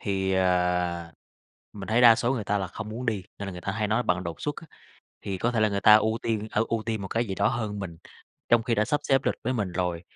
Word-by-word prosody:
thì, 95 -1 -1
ờ, 90 -2 +1 0.6
mình 100 -1 -8
thấy 115 +2 +3
đa 120 -2 +9
số 120 +2 0
người 110 -5 -3
ta 105 0 0
là 95 - -2
không 105 +4 -7
muốn 120 +3 -6
đi, 105 -4 -1 0.2
nên 100 -1 -5
là - - -5
người 90 - -8
ta 95 - -3
hay 105 0 -1
nói 110 +3 +1
bận 90 -3 0
đột 85 -1 -6
xuất 145 -1 -2
á. 165 - -10 0.6
Thì 95 -2 -4
có 120 - +1
thể 115 -3 0
là 110 - +4
người 100 -1 -2
ta 105 +1 +8
ưu 110 +1 +1
tiên 110 -1 -2
hở 105 +2 +2
ưu 115 -1 -1
tiên 110 -3 -3
một 95 - -5
cái 115 +1 0
gì 95 - -3
đó - - +2
hơn 110 -5 -3
mình, 85 -4 -6 0.5
trong 120 -1 +4
khi 115 0 0
đã 105 0 +2
sắp 145 +4 0
xếp 135 -1 +2
lịch - - +1
với 130 - 0
mình 105 -7 -2
rồi, 90 -1 -2
105 Hz, 285 wpm, -26 LUFS, 95-115 Hz, 0.6 s, đa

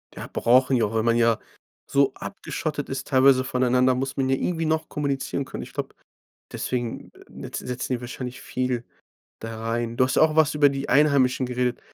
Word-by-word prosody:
Ja, - - -7
brauchen 130 +2 +3
die 120 - +2
auch, 105 0 -1
wenn 110 0 +1
man 115 0 +3
ja 115 -1 +3 0.5
so 140 -1 +3
abgeschottet 155 -6 -5
ist 135 0 -4
teilweise 130 -1 +5
voneinander, 125 0 +2
muss 130 +1 -3
man 130 -1 +1
ja 135 - +3
irgendwie 165 +3 -1
noch 160 0 0
kommunizieren 140 -1 -2
können. - - -7
Ich - - -12
glaube, - - -5 0.6
deswegen 120 -2 -4 0.2
netz - - -7
setzen 125 +1 -4
die 125 - -3
wahrscheinlich 125 +1 -7
viel 125 -2 -2 0.6
da 115 0 -6
rein. 115 0 -2
Du 130 - +4
hast 130 - -1
auch 155 0 +4
was 155 -1 +4
über 145 -1 +5
die 140 0 -4
Einheimischen 135 -3 +3
geredet 125 0 -1
130 Hz, 185 wpm, -24 LUFS, 125-140 Hz, 0.6 s, teilweise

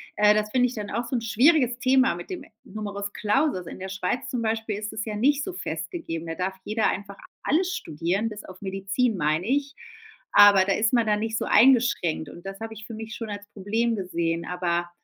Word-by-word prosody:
äh, 210 0 +5
das 210 0 0
finde 250 +1 +3
ich 250 - -6
dann 210 -2 -5
auch 235 +3 -2
so 250 - -3
'n 235 - 0
schwieriges 245 +2 +3
Thema 260 -3 +3
mit 175 - -9
dem 365 - -5 0.2
Numerus 205 -1 -5
Clausus. 210 - 0
In - - -8
der 190 +1 -6
Schweiz 190 +5 -2
zum 245 - -2
Beispiel 220 -2 -1
ist 210 0 -5
es 220 - -4
ja 215 - -4
nicht 280 +6 +2
so 370 - -5
festgegeben. 325 - -5
Da 165 - -4
darf 185 +2 -3
jeder 215 +1 +1
einfach 200 0 -5 0.3
alles 360 +5 +1
studieren, 170 +8 -2
bis 210 -1 -7
auf 185 0 -12
Medizin, 195 +5 0
meine 155 0 0
ich. 280 +4 0 0.6
Aber, 205 -2 +8
da 195 - +2
ist 220 +1 +1
man 235 -2 +3
dann 210 -1 +1
nicht 225 +1 -2
so - - -2
eingeschränkt, 225 - +3
und 175 - -12
das 195 +1 -7
habe 225 0 -5
ich 215 0 -10
für 230 - -7
mich 220 +1 -7
schon 225 -2 -6
als 205 0 -6
Problem 225 +4 0
gesehen. 170 -4 -2
Aber 175 -1 -1
210 Hz, 220 wpm, -25 LUFS, 190-240 Hz, 0.6 s, Aber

